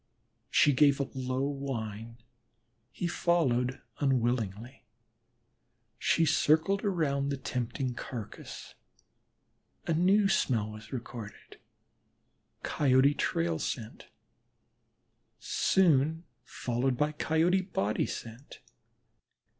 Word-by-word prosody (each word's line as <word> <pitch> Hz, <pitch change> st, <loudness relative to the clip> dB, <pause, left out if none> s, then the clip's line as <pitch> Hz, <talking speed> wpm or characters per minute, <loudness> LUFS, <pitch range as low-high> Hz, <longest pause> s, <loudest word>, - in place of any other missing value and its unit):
She 145 Hz, -2 st, +4 dB
gave 140 Hz, +1 st, +4 dB
a 140 Hz, -, -2 dB
low 130 Hz, 0 st, -2 dB
whine; 115 Hz, -5 st, -5 dB, 0.7 s
he 175 Hz, -, -4 dB
followed 130 Hz, -8 st, +1 dB, 0.2 s
unwillingly. 120 Hz, -3 st, -1 dB, 1.2 s
She 165 Hz, -, +3 dB
circled 160 Hz, +5 st, +2 dB
around 145 Hz, -8 st, 0 dB
the 140 Hz, -, -2 dB
tempting 125 Hz, 0 st, -3 dB
carcass; 120 Hz, -3 st, -8 dB, 1.1 s
a 165 Hz, -, 0 dB
new 195 Hz, +5 st, +4 dB
smell 110 Hz, -, +1 dB
was 105 Hz, 0 st, -11 dB
recorded 120 Hz, -4 st, -8 dB, 1.0 s
Coyote 135 Hz, 0 st, +3 dB
trail 165 Hz, +1 st, -1 dB
scent, 115 Hz, -6 st, -5 dB, 1.3 s
soon 160 Hz, -3 st, +2 dB, 0.2 s
followed 125 Hz, +1 st, -1 dB
by 150 Hz, +3 st, +1 dB
Coyote 160 Hz, +5 st, +2 dB
body 105 Hz, -, -1 dB
scent. 115 Hz, +4 st, -8 dB
135 Hz, 85 wpm, -30 LUFS, 120-160 Hz, 1.3 s, She